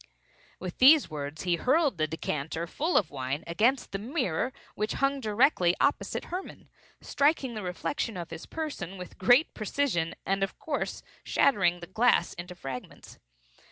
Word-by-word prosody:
With 180 -1 -6
these 285 - +7
words 145 0 -5
he 175 -2 +1
hurled 275 - +2
the 155 - +2
decanter, 160 +1 -3
full 315 - 0
of 185 - +1
wine, 135 +2 -3
against 225 +10 +1
the 195 - -3
mirror 245 - -1 0.2
which 215 +1 -2
hung 275 0 +1
directly 215 - +3
opposite 285 - 0
Hermann; 370 +2 -6 0.3
striking 280 -3 +1
the 215 - -5
reflection 190 +4 -3
of 170 -2 -6
his - - -8
person 250 - -5
with 180 -1 -10
great 245 - +5
precision, 215 -7 -1
and 195 0 0
of 195 - -2
course 300 -3 -3 0.2
shattering 175 -9 +2
the - - -6
glass 215 -1 +2
into 180 +1 -8
fragments. 135 -6 -8
195 Hz, 155 wpm, -28 LUFS, 170-270 Hz, 0.3 s, these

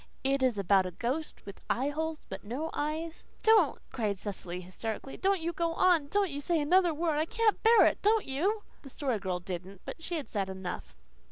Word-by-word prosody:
"It 275 0 +1
is 255 -4 +2
about 195 -1 +3
a 180 - -9
ghost 270 +6 -3
with 200 - -10
eyeholes 305 +5 -1
but 190 0 -7
no 270 +10 -4
eyes 315 +2 -3
" - - -30
"Don't," 435 -9 +5
cried 210 -5 -1
Cecily 185 -3 -6
hysterically. 220 +8 -5
"Don't 390 0 +1
you 340 +1 -2
go 335 +1 0
on! 340 -6 +4
Don't 400 +2 +1
you 285 - -4
say 330 +3 +1
another 350 +4 +4
word! 315 -1 0
I 310 - +2
can't 455 +1 +1
bear 455 +1 +7
it! - - +2
Don't 435 +1 +3
you!" 385 +11 0 0.2
The 275 - -11
Story 260 -5 -2
Girl 185 -2 -2
didn't. 185 +1 -7
But - - -7
she 345 +2 -4
had 300 -4 -4
said 195 -3 -2
enough. 190 -1 -6
290 Hz, 205 wpm, -30 LUFS, 205-335 Hz, 0.2 s, bear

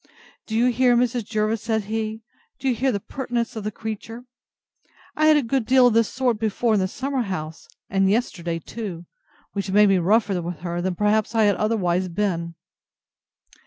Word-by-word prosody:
Do 220 - -3
you 245 +2 +3
hear, 245 0 +3
Mrs. 240 -2 0
Jervis? 215 0 -1
said 220 -1 -1
he: 220 +1 -4 0.3
do 270 - -4
you 260 - +3
hear 260 +3 +1
the 200 - -1
pertness 240 +1 -3
of 220 - -5
the 210 - -1
creature? 225 +3 -7 0.9
I 310 0 +3
had 310 -1 +6
a 290 - +1
good 255 +2 0
deal 255 -1 +6
of 245 - +4
this 230 -1 +2
sort 250 -4 0
before 220 +1 0
in 210 - +3
the 185 - +1
summer 265 +5 -2
house, 160 -7 -5 0.2
and 195 0 +2
yesterday 180 -6 -1
too, 175 -1 -7 0.5
which 200 -1 -3
made 205 +1 +5
me 195 -1 +4
rougher 200 0 +2
with 170 -1 -6
her 175 0 -3
than 185 0 -1
perhaps 210 +3 +1
I 225 - +4
had 205 -1 +4
otherwise 185 -4 0
been. 170 -2 -2
215 Hz, 190 wpm, -23 LUFS, 190-235 Hz, 0.9 s, had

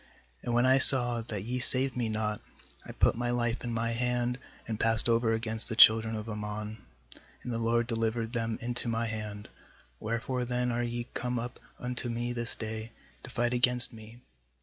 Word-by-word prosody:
3And 120 - -3
when 120 +1 +3
I 130 +1 +4
saw 120 -3 +6
that 105 -4 -6
ye 125 +3 -3
saved 130 +1 +1
me 120 -3 -2
not, 105 -1 -3 0.4
I - - -9
put - - +2
my 120 +1 -3
life 120 0 -1
in 120 - -4
my 115 0 -1
hand, 125 +1 -1 0.3
and 110 -2 -4
passed 115 0 +2
over 115 -1 +2
against 110 0 -2
the 110 - -3
children 110 0 +6
of 110 0 -6
Ammon, 105 0 -6 0.6
and 125 - -5
the 115 - -2
LORD 115 +1 +1
delivered 115 0 -2
them 115 -2 -2
into 120 0 -3
my 115 0 -1
hand; 105 -2 -6 0.5
wherefore 115 +3 -3
then 125 0 -1
are 120 +1 -1
ye 120 0 -4
come 125 0 -3
up 120 +1 -6 0.2
unto 125 0 -3
me 120 +1 -3
this 120 -1 -3
day, 110 0 -6 0.3
to - - -7
fight 120 0 -1
against 125 0 +7
me?' 110 +2 -13
115 Hz, 190 wpm, -29 LUFS, 110-120 Hz, 0.6 s, against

